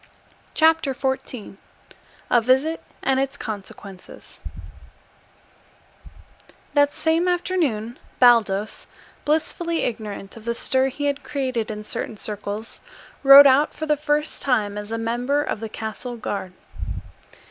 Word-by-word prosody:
CHAPTER 320 -4 +3
XIV 260 -6 -4 0.7
A 240 - +5
VISIT 265 +7 +2 0.2
AND 265 -1 +2
ITS 270 0 -1
CONSEQUENCES 200 -3 -9 2.3
That 285 -1 +4
same 325 +4 +1
afternoon 315 - -1 0.2
Baldos, 220 -4 +3 0.4
blissfully 325 +2 0
ignorant 210 -4 -5
of 225 -1 -12
the 235 0 -1
stir 260 +2 +2
he 285 +2 -4
had 285 0 -1
created 260 -5 -2
in 210 -1 -5
certain 215 +1 -5
circles, 210 +2 -5 0.4
rode 275 +1 +10
out 280 +2 +4
for 315 - -4
the 300 -1 +2
first 300 +1 -1
time 215 -6 +1
as 210 +1 -6
a 225 - -1
member 245 +6 0
of 220 - -3
the 225 0 -5
Castle 225 +3 -6
Guard. 195 -4 -4
250 Hz, 120 wpm, -23 LUFS, 215-290 Hz, 2.3 s, rode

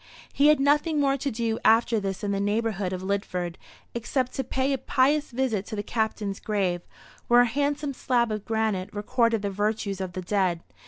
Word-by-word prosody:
He 285 - +4
had 300 -1 +5
nothing 295 +3 +2
more 275 -1 +3
to 280 +1 -2
do 225 -2 -2
after 225 0 +4
this 195 -1 -4
in 205 - 0
the 200 - 0
neighbourhood 205 -2 -1
of 185 0 -4
Lidford, 185 -3 -2 0.4
except 250 +2 -1
to 265 - -2
pay 265 +2 0
a 270 - -1
pious 285 +5 +2
visit 240 -5 -1
to - - -5
the 205 - -3
Captain's 215 -2 -2
grave, 190 -5 -1 0.5
where 240 0 +6
a - - +5
handsome 285 +3 -1
slab 240 -3 +1
of 215 -1 -3
granite 220 -4 -1
recorded 230 +1 +1
the 200 - -1
virtues 205 -1 -1
of 185 -1 -4
the 185 - -4
dead. 180 -3 0
220 Hz, 195 wpm, -26 LUFS, 200-260 Hz, 0.5 s, where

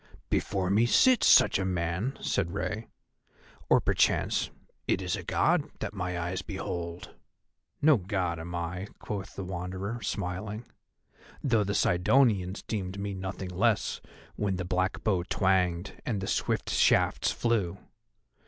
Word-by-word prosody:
"Before 95 -2 0
me 110 +4 +4
sits 255 - +5
such - - +6
a - - 0
man," 95 +7 -1
said 95 -1 -1
Rei, 110 +2 -3 0.8
"or - - +6
perchance - - +1 0.4
it - - +2
is - - -1
a - - -5
God - - +1
that - - -4
my 90 -1 -3
eyes 90 +2 -2
behold." 90 -3 -5 0.7
"No 155 -2 +7
God 90 -4 -2
am 85 +2 -6
I," 85 +3 -3
quoth 100 -1 -6
the 100 - -4
Wanderer, 95 +5 -4
smiling, 100 +3 -4 0.8
"though 115 -6 +3
the 100 +1 -2
Sidonians 95 0 +2
deemed 95 -3 -4
me 100 0 -3
nothing 95 0 -5
less 110 +4 +1 0.3
when 100 -2 -1
the 90 -1 -3
black 95 +1 -1
bow 95 -5 +2
twanged 90 -1 +1
and 110 -5 -2
the 95 - -3
swift 95 - -1
shafts - - +3
flew. 105 -7 0
95 Hz, 140 wpm, -29 LUFS, 90-105 Hz, 0.8 s, No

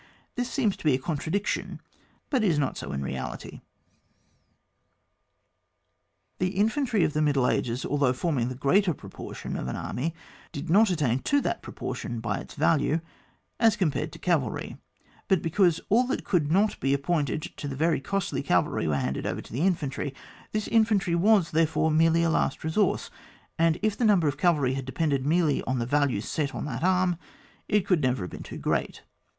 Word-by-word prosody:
This 245 0 -2
seems 230 -6 +1
to - - -13
be 150 -5 +4
a - - +1
contra 155 +2 -3
diction, 200 +2 -2 0.5
but 260 -6 +2
is 175 -7 +3
not 140 -2 0
so - - -6
in 70 0 -3
reality. 65 -1 -6 2.8
The 185 +1 -1
infantry 220 - +2
of - - +1
the 155 - +1
middle 140 -4 +2
ages, 120 +1 -1
although 140 -3 +2
forming 130 -2 -1
the 130 - -5
greater 175 +6 +2
proportion - - -7
of - - -3
an 65 - -3
army, 160 +6 -3 0.4
did 150 +3 -5
not 210 +3 +6
attain 145 -8 +1
to 285 - +2
that - - -2
proportion 120 - -5
by 115 - -2
its - - -10
value 155 +1 +2 0.6
as 225 -2 +5
compared 150 -3 -1
to - - -9
cavalry, 155 -10 -1 0.5
but 190 -3 +2
because 170 0 +3
all 245 +4 +4
that 265 - -2
could 155 -6 +1
not 200 +4 +2
be 135 +1 +2
appointed 150 +1 -1
to 160 -7 -5
the 135 - -4
very 160 +1 +1
costly 195 +6 -2
cavalry - - +1
were 75 -2 +1
handed 65 0 -2
over - - -3
to - - -13
the 130 - -2
infantry; 150 -6 -1 0.4
this 215 -1 -2
infantry 215 -5 +3
was, 185 0 +3
therefore, 160 0 +2
merely 165 +1 +4
a - - +3
l9«t 165 - 0
resource; 175 +5 0 0.5
and 165 0 +3
if 215 -2 +2
the - - -2
number 195 -7 +4
of 145 - 0
cavalry 150 -8 +2
had 135 -1 -4
depended 140 0 -1
merely 160 -2 +2
on 130 - -1
the 120 - -1
value 140 -4 +1
set 145 +5 -2
on - - -4
that 135 0 -4
arm, 180 -2 +2 0.5
it 210 -2 +2
could 180 -5 +2
never 125 -6 0
have 90 - -6
been - - -8
too - - -8
great. - - -2
160 Hz, 185 wpm, -27 LUFS, 135-190 Hz, 2.8 s, not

